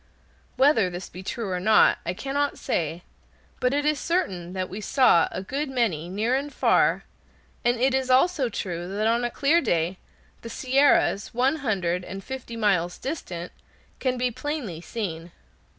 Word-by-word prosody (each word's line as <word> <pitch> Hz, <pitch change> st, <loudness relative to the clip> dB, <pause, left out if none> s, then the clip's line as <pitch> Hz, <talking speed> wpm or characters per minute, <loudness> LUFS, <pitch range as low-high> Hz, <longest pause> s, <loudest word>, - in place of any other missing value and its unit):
Whether 265 Hz, -9 st, +4 dB
this 175 Hz, +1 st, -7 dB
be 185 Hz, -, -9 dB
true 205 Hz, +1 st, -4 dB
or 180 Hz, -, -1 dB
not, 215 Hz, +3 st, +5 dB
I 175 Hz, -, -1 dB
cannot 280 Hz, +5 st, -1 dB
say, 165 Hz, +2 st, -2 dB, 0.6 s
but 250 Hz, -, +2 dB
it 290 Hz, +1 st, 0 dB
is 300 Hz, -1 st, +2 dB
certain 185 Hz, -, -2 dB
that 185 Hz, -1 st, -2 dB
we 200 Hz, +4 st, -7 dB
saw 210 Hz, -, +4 dB
a 185 Hz, -, -5 dB
good 275 Hz, +8 st, -3 dB
many, 205 Hz, -, -1 dB
near 215 Hz, +6 st, 0 dB
and 280 Hz, +2 st, -1 dB
far, -, -, +2 dB, 0.6 s
and 240 Hz, 0 st, +2 dB
it 260 Hz, +2 st, +3 dB
is 265 Hz, -1 st, 0 dB
also 265 Hz, 0 st, +3 dB
true 175 Hz, -5 st, -4 dB
that 215 Hz, -, 0 dB
on 230 Hz, +2 st, +2 dB
a 240 Hz, -, 0 dB
clear 300 Hz, +7 st, +2 dB
day 175 Hz, -, 0 dB, 0.4 s
the 230 Hz, -, -8 dB
Sierras, 260 Hz, -5 st, +2 dB
one 265 Hz, +5 st, +2 dB
hundred 185 Hz, -, -1 dB
and 195 Hz, +2 st, -7 dB
fifty 260 Hz, -3 st, -7 dB
miles 185 Hz, -5 st, +1 dB
distant, 185 Hz, -, -5 dB, 0.5 s
can 255 Hz, -1 st, 0 dB
be 250 Hz, 0 st, 0 dB
plainly 255 Hz, -, -4 dB
seen. 175 Hz, -5 st, -5 dB
230 Hz, 165 wpm, -25 LUFS, 180-265 Hz, 0.6 s, not